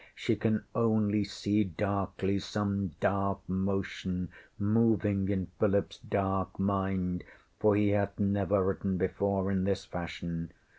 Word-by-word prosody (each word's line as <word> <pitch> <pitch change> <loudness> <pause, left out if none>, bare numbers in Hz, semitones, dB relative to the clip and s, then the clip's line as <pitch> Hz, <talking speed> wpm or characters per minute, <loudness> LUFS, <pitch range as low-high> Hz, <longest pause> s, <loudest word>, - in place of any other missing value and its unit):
She - - 0
can 110 -1 +1
only 110 -2 +2
see 105 +1 +1
darkly 100 +1 -1
some 100 -2 -1
dark 100 0 0
motion 95 -1 -2 0.3
moving 105 -2 +2
in 95 -3 -1
PhilipŌĆÖs 100 -2 +1
dark 95 -1 0
mind, 95 -2 0 0.4
for 105 -1 +4
he 105 0 +3
hath 100 -1 +1
never 100 -1 +2
written 95 0 0
before 95 +1 0
in 95 -1 +1
this 95 0 0
fashion. 85 -1 -5
100 Hz, 120 wpm, -31 LUFS, 95-100 Hz, 0.4 s, for